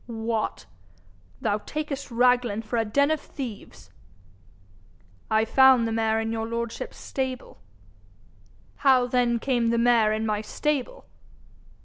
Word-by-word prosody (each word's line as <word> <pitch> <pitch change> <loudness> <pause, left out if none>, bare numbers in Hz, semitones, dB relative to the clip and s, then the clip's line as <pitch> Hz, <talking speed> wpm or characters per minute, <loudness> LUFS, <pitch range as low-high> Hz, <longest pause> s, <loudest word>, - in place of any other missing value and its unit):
'What! 225 -1 -3 0.8
thou 210 0 0
takest 290 +2 -5
Raglan 245 -2 +2
for 230 +2 -3
a 225 - +2
den 280 +7 +2
of 315 - 0
thieves?' 250 -7 -9 1.4
'I 220 0 +2
found 260 -1 +5
the - - -3
mare 225 0 +1
in 225 0 -2
your 225 0 -3
lordship's 230 0 -5
stable.' 260 -1 -5 1.2
'How 260 -3 +4
then 245 -1 +1
came 240 -1 0
the 235 - +1
mare 230 -2 +4
in 215 +1 -1
my 210 -1 -1
stable?' 295 - -3
235 Hz, 125 wpm, -25 LUFS, 225-260 Hz, 1.4 s, found